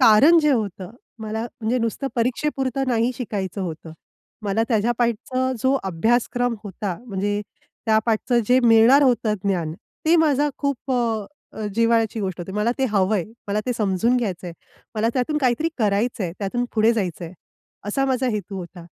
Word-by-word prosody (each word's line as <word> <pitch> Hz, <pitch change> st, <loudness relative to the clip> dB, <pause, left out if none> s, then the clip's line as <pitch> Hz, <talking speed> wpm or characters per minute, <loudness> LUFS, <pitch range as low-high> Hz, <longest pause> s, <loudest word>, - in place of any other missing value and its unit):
कारण 260 Hz, +8 st, +7 dB
जे 300 Hz, -1 st, +3 dB
होतं 200 Hz, -6 st, -2 dB, 0.3 s
मला 220 Hz, +1 st, -3 dB, 0.2 s
म्हणजे 235 Hz, +3 st, 0 dB
नुसतं 230 Hz, +4 st, -2 dB
परीक्षेपुरतं 265 Hz, +2 st, -1 dB
नाही 235 Hz, 0 st, +1 dB
शिकायचं 200 Hz, -5 st, -4 dB
होतं. 160 Hz, -2 st, -6 dB, 0.5 s
मला 205 Hz, +2 st, +1 dB
त्याच्या 230 Hz, 0 st, +2 dB
पाठच 250 Hz, +1 st, -1 dB
जो 260 Hz, +1 st, +3 dB
अभ्यासक्रम 240 Hz, +6 st, +1 dB
होता 195 Hz, -2 st, -4 dB
म्हणजे 205 Hz, 0 st, -1 dB, 0.5 s
त्या 220 Hz, -1 st, +4 dB
पाठच 225 Hz, +2 st, 0 dB, 0.2 s
जे 250 Hz, +1 st, +6 dB
मिळणार 235 Hz, +4 st, +6 dB
होतं 235 Hz, -5 st, +2 dB
ज्ञान 175 Hz, -6 st, 0 dB, 0.3 s
ते 335 Hz, -, +6 dB
माझा 295 Hz, -3 st, +3 dB
खूप 280 Hz, -2 st, -2 dB, 0.6 s
अ, 215 Hz, -, -4 dB
जिव्हाळ्याची 230 Hz, -1 st, +2 dB
गोष्ट 185 Hz, -3 st, -3 dB
होती. 175 Hz, +2 st, -6 dB
मला 210 Hz, +3 st, +1 dB
ते 265 Hz, -, +2 dB
हवंय, 195 Hz, -2 st, +2 dB, 0.2 s
मला 205 Hz, +1 st, 0 dB
ते 250 Hz, -, +1 dB
समजून 215 Hz, +4 st, +2 dB
घ्यायचंय. 185 Hz, -7 st, -3 dB, 0.4 s
मला 220 Hz, +1 st, +1 dB
त्यातून 275 Hz, +4 st, 0 dB
काहीतरी 265 Hz, +3 st, +1 dB
करायचंय 210 Hz, -3 st, 0 dB
त्यातून 215 Hz, +5 st, -1 dB
पुढे 220 Hz, +1 st, +4 dB
जायचंय. 180 Hz, -6 st, -3 dB, 0.5 s
असा 270 Hz, +7 st, 0 dB
माझा 260 Hz, -1 st, +1 dB
हेतू 205 Hz, -2 st, -4 dB
होता. 175 Hz, -1 st, -9 dB
225 Hz, 150 wpm, -22 LUFS, 200-250 Hz, 0.6 s, कारण